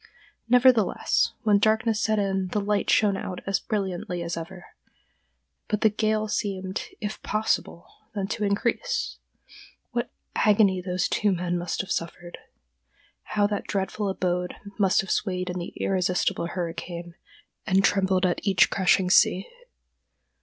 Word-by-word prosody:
Nevertheless, 250 -3 +4
when 210 -3 +4
darkness 220 +1 +2
set 220 -1 +1
in 195 -2 0
the 210 - -1
light 205 0 0
shone 205 -2 +4
out 185 -1 -5
as 195 0 +1
brilliantly 185 -4 -3
as 170 0 -3
ever, 175 +2 -8 1.0
but 210 - -1
the 220 - +4
gale 215 0 0
seemed, 195 -3 -3
if 210 0 -5
possible, 215 -5 -1 0.3
then 200 -2 -1
to 210 - -2
increase. 235 - -1 0.7
What 240 0 -2 0.3
agony 205 -3 +4
those 180 0 -1
two 210 -1 +1
men 175 -1 -1
must 175 -1 -2
have 195 - -8
suffered! 175 +1 -4 0.8
How 205 -1 0
that 205 0 -2
dreadful 200 +1 -2
abode 180 -1 -1 0.2
must 195 -2 +4
have 195 - -6
swayed 185 -3 -1
in 180 - -4
the 175 - -6
irresistible 180 -2 0
hurricane, 170 0 -5 0.5
and 190 0 +3
trembled 190 -1 +2
at 175 - +1
each 195 -2 +3
crashing 185 -1 +3
sea! 185 0 +4
195 Hz, 140 wpm, -26 LUFS, 180-210 Hz, 1.0 s, Nevertheless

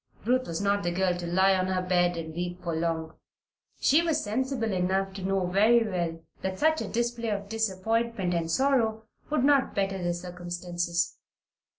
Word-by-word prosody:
Ruth 255 +2 +2
was 165 -1 -3
not 200 0 +2
the 175 - -1
girl 180 0 +1
to 175 -1 -5
lie 190 +3 +4
on 185 -1 +1
her 185 0 0
bed 175 -1 +2
and 160 -1 -5
weep 175 +1 -4
for 170 -2 -2
long. 160 -1 -2 0.7
She 300 +4 +4
was 320 -3 0
sensible 230 +1 -1
enough 190 +1 0
to 195 - -7
know 190 0 0
very 215 +5 +4
well 170 -4 -3 0.2
that 190 0 -3
such 315 +4 +2
a - - -3
display 235 0 -1
of 200 -1 -3
disappointment 225 -1 0
and 165 -1 -1
sorrow 225 0 +2 0.3
would 300 -4 +1
not 280 -1 +3
better 195 -1 -1
the 175 0 0
circumstances. 175 0 -3
190 Hz, 180 wpm, -28 LUFS, 175-225 Hz, 0.7 s, lie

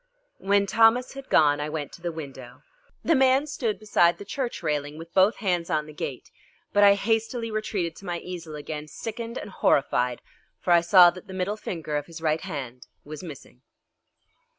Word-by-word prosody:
When 200 +1 +2
Thomas 230 +4 +3
had 275 -1 -10
gone 145 -2 +4
I 150 - -3
went 150 -2 -4
to - - -13
the 175 0 -3
window. 135 -6 -9 0.4
The 330 - +3
man 265 0 +4
stood 250 -8 -2
beside 175 -5 +3
the 200 - -9
church 245 +3 -4
railing 145 0 -2
with 165 +1 -11
both 195 +3 +4
hands 180 -4 -1
on 155 -3 0
the 155 - -11
gate, 135 -3 -6 0.4
but 205 - +5
I 200 0 +7
hastily 225 +2 -1
retreated 200 -6 -2
to 195 - -12
my 175 -2 -2
easel 170 -3 -7
again, 150 0 -6
sickened 230 +8 -6
and - - -7
horrified, 125 -7 +1 0.4
for 175 - +2
I 170 - +6
saw 175 0 +7
that 185 +3 -12
the 190 - -8
middle 190 +3 -1
finger 160 -7 -4
of 145 - -4
his 165 -1 -9
right 160 0 0
hand 125 -5 -7 0.2
was 150 0 -8
missing. 145 -7 -11
175 Hz, 190 wpm, -26 LUFS, 150-215 Hz, 0.4 s, I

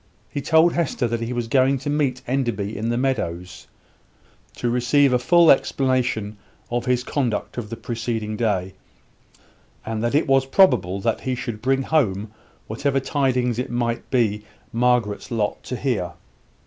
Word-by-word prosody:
He 145 - -3
told 160 +3 +4
Hester 155 -7 0
that 115 0 -2
he 115 +1 -3
was 120 -2 -2
going 135 +3 +3
to 135 +3 -8
meet 140 -4 0
Enderby 120 -6 -2
in 110 +3 -2
the 120 - 0
meadows, 90 -10 -3 0.9
to 120 - -2
receive 125 +3 +3
a 125 - +3
full 170 +5 +6
explanation 125 -6 0 0.3
of 120 0 -1
his 125 -1 +1
conduct 125 -5 -2
of 105 -3 -7
the 115 - -6
preceding 115 -2 -3
day; 95 -4 -1 1.1
and 110 0 -3
that 120 +4 0
it 150 - +3
was 135 -1 +3
probable 100 - +3
that 115 +2 -1
he 130 -1 -2
should 115 -3 -5
bring 135 +1 +1
home 110 -9 0 0.3
whatever 135 +5 -1
tidings 130 -4 0
it 125 - -3
might 120 -1 -2
be 105 -5 +1 0.3
Margaret's 120 -2 +1
lot 110 -4 -1
to 125 - -4
hear. 110 -10 -2
120 Hz, 160 wpm, -22 LUFS, 110-135 Hz, 1.1 s, full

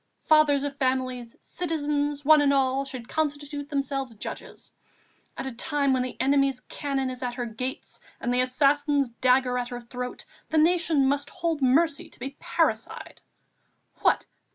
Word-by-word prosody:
Fathers 305 -3 +4
of 285 -1 -4
families, 255 -3 -1
citizens, 295 -4 -2
one 305 0 +7
and 285 -1 +4
all, 270 0 +2
should 255 -4 -8
constitute 290 -1 -3
themselves 275 -3 -2
judges. 205 - -7 0.7
At - - -4
a 265 - -3
time 280 +2 +1
when 255 - +2
the 250 -1 -5
enemy's 275 0 +2
cannon 270 -2 -3
is 255 - -7
at 245 -1 -3
her 245 -1 -3
gates 255 +5 -5 0.2
and 245 - -1
the 250 - +3
assassin's 280 +2 +2
dagger 250 +1 +2
at 245 0 -3
her 245 -1 -5
throat, 250 +1 -6 0.2
the 320 - 0
Nation 325 -3 +3
must 285 +1 0
hold 330 -3 -2
mercy 285 +4 +2
to - - -15
be 270 +3 -6
parricide. - - -1 0.8
What! - - +2
275 Hz, 155 wpm, -26 LUFS, 255-290 Hz, 0.8 s, one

